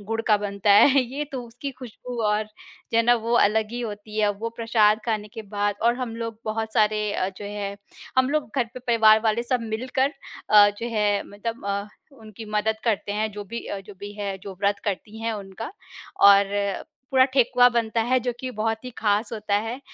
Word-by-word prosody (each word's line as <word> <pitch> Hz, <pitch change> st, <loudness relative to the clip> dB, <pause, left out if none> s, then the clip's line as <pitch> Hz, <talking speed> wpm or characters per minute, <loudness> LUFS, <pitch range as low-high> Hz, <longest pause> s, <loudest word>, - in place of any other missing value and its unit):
गुड़ 225 Hz, +2 st, -3 dB
का 210 Hz, -, +6 dB
बनता 205 Hz, 0 st, -1 dB
है 270 Hz, +7 st, +7 dB
ये 270 Hz, +4 st, -4 dB
तो 255 Hz, -2 st, -4 dB
उसकी 245 Hz, +4 st, -6 dB
खुशबू 250 Hz, 0 st, -8 dB
और 210 Hz, +1 st, +1 dB
जो 215 Hz, +1 st, -9 dB
है 230 Hz, -, +5 dB
ना 240 Hz, +1 st, +5 dB
वो 230 Hz, 0 st, -2 dB
अलग 215 Hz, +1 st, +2 dB
ही 240 Hz, -, -4 dB
होती 215 Hz, -1 st, -6 dB
है, 210 Hz, -1 st, +3 dB
वो 225 Hz, +3 st, -4 dB
प्रसाद 220 Hz, -2 st, +3 dB
खाने 215 Hz, -2 st, -2 dB
के 225 Hz, -, -6 dB
बाद 205 Hz, 0 st, -1 dB
और 235 Hz, +1 st, +4 dB
हम 245 Hz, -3 st, -4 dB
लोग 230 Hz, -1 st, -5 dB
बहुत 220 Hz, 0 st, -3 dB
सारे 210 Hz, -1 st, +2 dB
अ, 185 Hz, -, -1 dB
जो -, -, -7 dB
है 200 Hz, -1 st, -5 dB, 0.4 s
हम 260 Hz, +1 st, +3 dB
लोग 300 Hz, -6 st, -1 dB
घर 250 Hz, -, +3 dB
पे 255 Hz, -, -7 dB
परिवार 220 Hz, -3 st, +5 dB
वाले 220 Hz, +2 st, +2 dB
सब 245 Hz, 0 st, 0 dB
मिलकर 260 Hz, +4 st, 0 dB, 0.4 s
अ, 205 Hz, -1 st, +8 dB
जो 235 Hz, -, -3 dB
है 205 Hz, -1 st, +2 dB
मतलब 225 Hz, +3 st, -6 dB
अ, 200 Hz, +1 st, -2 dB, 0.2 s
उनकी 220 Hz, -3 st, -11 dB
मदद 220 Hz, +1 st, 0 dB
करते 205 Hz, -2 st, 0 dB
हैं 215 Hz, +1 st, -1 dB
जो 205 Hz, 0 st, -7 dB
भी 230 Hz, +4 st, -6 dB
अ, 200 Hz, -, -4 dB
जो 205 Hz, +1 st, -13 dB
भी 205 Hz, 0 st, -7 dB
है, 200 Hz, -1 st, -3 dB
जो 195 Hz, 0 st, -9 dB
व्रत 200 Hz, 0 st, +2 dB
करती 210 Hz, +2 st, -4 dB
हैं 225 Hz, 0 st, -1 dB
उनका, 205 Hz, -, -7 dB, 0.5 s
और 200 Hz, 0 st, +4 dB, 0.3 s
पूरा 260 Hz, -1 st, +6 dB
ठेकुआ 250 Hz, -1 st, +5 dB
बनता 230 Hz, -1 st, 0 dB
है 255 Hz, +3 st, +2 dB
जो 245 Hz, -, 0 dB
कि 255 Hz, -, -4 dB
बहुत 225 Hz, +1 st, -2 dB
ही 250 Hz, -, -6 dB
खास 210 Hz, +1 st, +1 dB
होता 210 Hz, -2 st, -2 dB
है। 230 Hz, +4 st, -5 dB
220 Hz, 210 wpm, -24 LUFS, 205-235 Hz, 0.5 s, अ